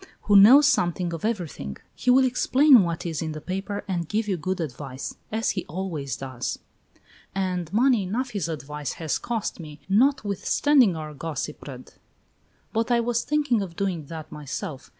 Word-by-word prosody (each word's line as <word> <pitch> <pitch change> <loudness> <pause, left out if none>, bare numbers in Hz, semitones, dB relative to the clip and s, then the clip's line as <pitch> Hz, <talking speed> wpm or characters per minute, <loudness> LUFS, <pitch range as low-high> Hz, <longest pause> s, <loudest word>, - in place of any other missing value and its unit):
who 205 - +3
knows 245 +9 +9
something 175 - +1
of 165 - -6
everything. 175 - -3 0.2
He 250 - -2
will 260 +1 +6
explain 255 +1 +5
what 170 -2 -2
is 165 -3 -3
in 160 -1 -3
the 155 - -6
paper 195 +5 -4
and 175 -4 -2
give 215 +1 -1
you 195 - +1
good 185 +3 -3
advice, 135 -3 -5 0.2
as 225 +1 0
he 185 - -3
always 155 - -4
does." 130 -1 -4 0.8
"And 180 -3 -2
money 240 +2 +3
enough 235 +7 -2
his 195 -7 -2
advice 150 -3 -5
has 160 -2 -2
cost 230 -5 -3
me, 150 -2 -9
notwithstanding 230 - +3
our 155 -1 -6
gossipred! 145 -3 -6 0.8
But 225 +2 0
I 240 -1 +3
was 235 0 0
thinking 290 -7 +1
of 180 -4 -6
doing 180 -6 -2
that 160 -1 -8
myself. 145 -2 -6
185 Hz, 165 wpm, -25 LUFS, 155-225 Hz, 0.8 s, knows